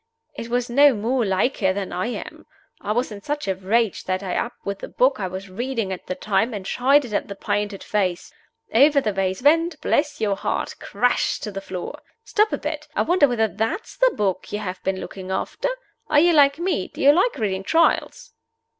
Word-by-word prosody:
It 230 - -7
was 245 0 0
no 280 +2 +5
more 235 +4 0
like 195 +6 +1
her 190 -2 +2
than 195 -1 -4
I 185 +5 -1
am. 245 - -7 0.3
I 205 - -3
was 240 +2 0
in 205 -1 -8
such 295 +1 -3
a 190 - +2
rage 200 +3 0
that 185 +1 -2
I 185 -2 -3
up 235 - -2
with 200 0 -3
the - - -6
book 260 0 +2
I 190 - -1
was 190 +2 -7
reading 225 0 -3
at 185 - -9
the 185 - -3
time 210 +4 0
and 195 -2 -6
shied 275 +6 +3
it 225 - -8
at - - -1
the 200 - -7
painted 205 0 -2
face. 185 -4 -1 0.4
Over 280 +4 +6
the 215 -6 -1
vase 190 +2 -1
went, 330 +3 +3
bless 290 0 0
your 210 -3 +1
heart, - - -2
crash 245 +5 0
to 210 - -5
the 195 0 -5
floor. 185 -2 -6 0.2
Stop 430 -1 +2
a - - 0
bit! - - -5
I - - +2
wonder 345 -4 +4
whether 230 -3 +1
that's 225 - -3
the - - +4
book 195 -3 -1
you 210 - -2
have 185 -3 -5
been 190 0 -2
looking 190 0 -8
after? 190 - -2 0.4
Are 295 - +4
you 345 +2 +5
like 285 -2 +5
me? 340 - -1
Do - - -14
you 280 - +7
like 375 +10 +2
reading 195 -3 -1
Trials?" 325 +12 +1
220 Hz, 215 wpm, -23 LUFS, 195-280 Hz, 0.4 s, you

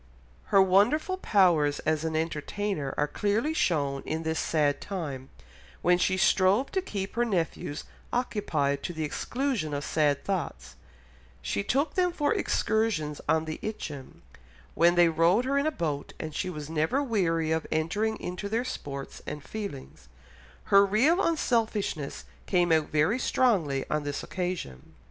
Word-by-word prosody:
Her 195 -1 +5
wonderful 225 - +3
powers 170 - +3
as 155 -1 0
an 160 -1 -2
entertainer 160 0 -2
are 145 - +2
clearly 215 - 0
shown 140 - 0
in 160 +1 -3
this 160 0 -1
sad 150 -3 +1
time, 145 -9 -5 0.5
when 175 0 +4
she 185 +1 +2
strove 195 +6 +3
to 380 - 0
keep 200 - -5
her 240 - +1
nephews 170 -8 -2 0.3
occupied 160 - 0
to 175 - -4
the 160 -1 -3
exclusion 230 - -2
of 145 - -3
sad 150 -3 +1
thoughts; 70 - -3 0.6
she 200 - -2
took 280 +8 0
them 360 -1 +2
for 295 -4 +1
excursions 205 -10 0
on 160 0 +3
the 155 0 -5
Itchen, 150 -11 -6 0.5
when 170 +1 +4
they 175 -1 +6
rowed 165 +8 +3
her 280 +1 +2
in 285 - 0
a - - +2
boat, 150 - -3
and 155 -1 -5
she 185 - -2
was 150 -4 -6
never 160 - 0
weary 165 - 0
of 160 0 -1
entering 210 +8 0
into 180 +3 -5
their 230 +4 0
sports 140 - -6
and 150 -1 -5
feelings; 140 - -7 0.6
her 200 0 +9
real 255 - +3
unselfishness 220 - -1 0.2
came 175 -2 +2
out 160 -2 +3
very 155 +11 +2
strongly 175 - +1
on 150 - 0
this 145 0 -4
occasion. 175 - -5
175 Hz, 155 wpm, -28 LUFS, 150-215 Hz, 0.6 s, her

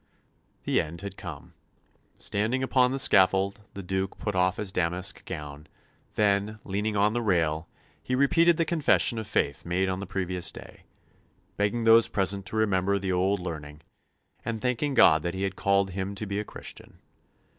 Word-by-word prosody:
The - - +2
end 85 +3 -8
had 100 -1 -7
come. 85 -7 -9 0.6
Standing 110 +6 -1
upon 130 -1 +3
the 135 - -1
scaffold, 100 -4 +3
the 100 - -6
Duke 95 +1 -3
put 105 - -3
off 90 0 +1
his 105 -3 -3
damask 90 +2 -2
gown; 75 -3 -7 0.5
then, 105 +1 +1
leaning 105 +2 -2
on 105 +2 +3
the 120 - -1
rail, 85 -6 0 0.3
he 125 - -2
repeated 165 +5 +4
the 165 - +1
confession 150 -8 +2
of 110 - -6
faith 70 -9 -1
made 95 +2 0
on 95 0 -2
the 100 - -6
previous 90 -1 -3
day, - - -13 0.7
begging 105 +3 0
those 115 0 +6
present 100 0 +1
to 100 - -6
remember 100 -2 +1
the 95 -1 -2
old 95 +2 +1
learning, 75 -4 -7 0.6
and 115 -1 -3
thanking 125 +4 -1
God 80 -9 +6
that 85 +3 -3
He 95 - -3
had 95 -1 -2
called 100 -1 +1
him 95 +2 -4
to 110 - -4
be 100 0 -3
a - - -2
Christian. - - -9
100 Hz, 175 wpm, -27 LUFS, 90-110 Hz, 0.7 s, those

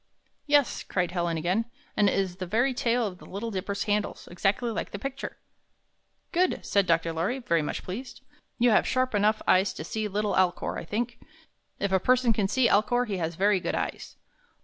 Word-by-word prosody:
"Yes," 290 -2 +3
cried 180 -2 -1
Helen 170 -2 -1
again, 180 +8 0 0.3
"and 205 -1 +4
it - - 0
is 185 -2 -1
the 185 -1 -5
very 240 +8 +2
tail 240 -1 +1
of 185 -3 -5
the - - -13
Little 225 +4 -4
Dipper's 200 +1 -2
handle, 210 0 0
exactly 195 +6 0
like - - -3
the - - -6
picture." 275 +5 -5 0.9
"Good!" 365 +1 +1
said 200 -2 +2
Dr. 165 0 +2
Lorry, 180 +11 -1
very 170 -11 +1
much 150 - -4
pleased. 235 +8 -7 0.4
"You 240 0 +4
have 215 - +4
sharp 255 -1 +1
enough 210 +1 +2
eyes 185 +1 +4
to - - -6
see 215 +6 -3
little 210 +1 -1
Alcor, 185 -2 +1
I - - -8
think. 235 +6 -3 0.6
If 200 - -1
a 190 - +4
person 250 +2 +3
can 210 -3 +1
see 240 +4 +3
Alcor, 245 +4 +3
he 205 -4 -3
has 165 -1 -2
very 200 +2 +3
good - - -2
eyes. - - -4
205 Hz, 195 wpm, -27 LUFS, 185-240 Hz, 0.9 s, and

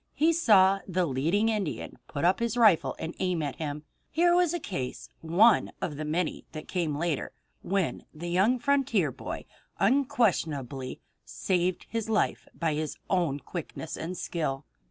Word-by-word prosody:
He 325 +3 +4
saw 195 - +5
the 185 -1 +1
leading 165 +10 +1
Indian 210 -7 -3
put 145 +3 -2
up 180 +2 +4
his 235 0 -1
rifle 215 -8 +4
and 165 - -5
aim 180 -4 0
it 145 - 0
at - - -10
him. 150 -1 -4 0.3
Here 345 +2 +3
was 355 -2 +4
a 345 - -2
case, 135 - -5
one 190 +8 +4
of 150 - -3
the 155 +2 -4
many 160 +2 -1
that 155 -1 -7
came 165 -5 -1
later, 165 -2 -1 0.3
when 195 -2 -1
the 170 +2 -6
young 200 +8 +3
frontier 245 - +2
boy - - -6 0.3
unquestionably 160 - +1 0.2
saved 180 -1 -1
his 225 -1 -3
life 215 - 0
by 165 -2 0
his 155 0 -3
own 165 -7 +1
quickness 160 -2 -6
and 175 +3 -5
skill. 145 -6 -3
180 Hz, 160 wpm, -28 LUFS, 155-220 Hz, 0.3 s, saw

